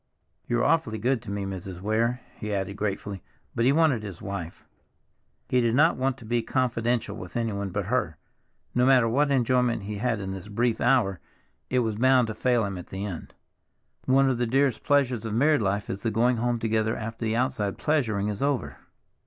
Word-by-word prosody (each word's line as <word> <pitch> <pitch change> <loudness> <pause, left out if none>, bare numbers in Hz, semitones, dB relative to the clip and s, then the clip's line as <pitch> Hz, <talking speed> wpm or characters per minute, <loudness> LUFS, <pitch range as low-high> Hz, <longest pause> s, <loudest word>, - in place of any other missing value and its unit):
You're 120 0 +1
awfully 150 -9 +1
good 120 +3 0
to - - -10
me, 100 -1 -3
Mrs. 95 -1 -6
Weir," 115 +5 0 0.2
he 105 -1 -4
added 100 0 -3
gratefully; 100 -1 -3 0.3
but 115 - +1
he 130 - +5
wanted 150 -6 +3
his 100 -5 -8
wife—he 100 +6 -6
did 115 0 +1
not 160 +5 +5
want 130 0 -1
to 120 - -13
be 120 +2 0
confidential 120 -3 -1
with 90 +1 -7
anyone 100 -4 -2
but 100 +1 -3
her. 100 -8 -1 0.6
No 125 - +2
matter 130 -3 +5
what 140 +6 +2
enjoyment 125 -4 +2
he 105 +1 -5
had 115 0 0
in 95 -1 -4
this 95 0 -7
brief 115 +3 0
hour, 120 -7 +2 0.5
it 125 0 +2
was 110 -3 -2
bound 130 -1 +4
to - - -3
fail 120 0 +1
him 100 -2 -4
at 90 - -10
the 95 +2 -5
end. 90 -6 -7 0.7
One 135 +1 +4
of 130 -3 0
the 120 - +1
dearest 135 -1 +1
pleasures 130 -5 +2
of 110 -1 -3
married 145 +3 +3
life 100 0 -1
is 100 - -5
the 115 - 0
going 120 +3 +2
home 120 +1 0
together 110 -1 0
after 115 +1 -6
the 110 0 0
outside 120 -5 -1
pleasuring 110 -10 0
is 105 -1 -3
over. 140 -2 -1
115 Hz, 195 wpm, -26 LUFS, 100-125 Hz, 0.7 s, he